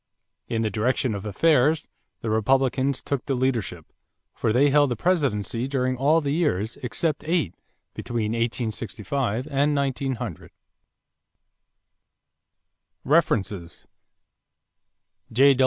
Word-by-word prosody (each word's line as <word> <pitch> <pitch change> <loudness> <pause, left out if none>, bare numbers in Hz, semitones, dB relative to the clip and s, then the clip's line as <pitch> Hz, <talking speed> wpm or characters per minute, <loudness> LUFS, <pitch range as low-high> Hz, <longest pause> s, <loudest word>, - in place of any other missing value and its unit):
In 115 -1 -1
the 110 - 0
direction 120 +3 0
of 100 +1 -5
affairs, 150 - +3 0.3
the 115 - -2
Republicans 130 +4 +1
took 140 -4 -2
the 135 - +1
leadership, 115 -10 -1 0.5
for 110 - 0
they 135 +5 +4
held 145 -1 +4
the 120 - -1
presidency 125 - 0
during 130 -2 0
all 150 +6 +3
the 140 -2 -1
years, 115 - 0
except 150 +5 -2
eight, 160 - +1 0.4
between 115 -3 -2
1865 115 +1 -2
and 145 +2 +2
1900. 130 - -2 2.5
=References= 105 - 0 1.5
J. 135 +4 +6
130 Hz, 105 wpm, -25 LUFS, 110-140 Hz, 2.5 s, J